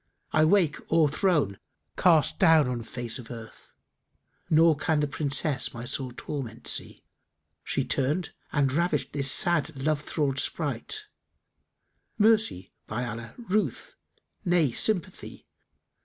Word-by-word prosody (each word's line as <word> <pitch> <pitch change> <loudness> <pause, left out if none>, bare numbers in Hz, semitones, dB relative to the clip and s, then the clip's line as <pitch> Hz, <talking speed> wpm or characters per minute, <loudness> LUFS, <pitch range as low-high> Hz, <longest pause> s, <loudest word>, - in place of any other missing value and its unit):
I 155 0 +4
wake 170 -3 +3
o'erthrown, 155 - +2 0.4
castdown 160 -2 +4
on 125 -2 -2
face 120 +1 -4
of 115 - -11
earth 115 -2 -11 0.4
* - - -45 0.3
Nor 160 0 +5
can 155 +1 0
the 150 - +2
Princess[FN#288] 140 -1 0
my 120 +1 -6
sore 130 0 -3
torment 125 -3 -6
see. - - -1 0.6
She - - -1
turned 150 +7 0 0.2
and 140 -3 +1
ravished 170 -1 0
this 140 -2 +2
sad 165 -4 +1
Love 150 +2 0
thrall'd 140 -3 -1
sprite; 430 - -2 0.6
* - - -50
Mercy, 215 - +2 0.2
by 120 +4 -3
Allah, 115 0 -7
ruth; 210 - -2 0.5
nay, 175 -6 +2
sympathy! 185 - -2
150 Hz, 125 wpm, -27 LUFS, 130-170 Hz, 0.6 s, Nor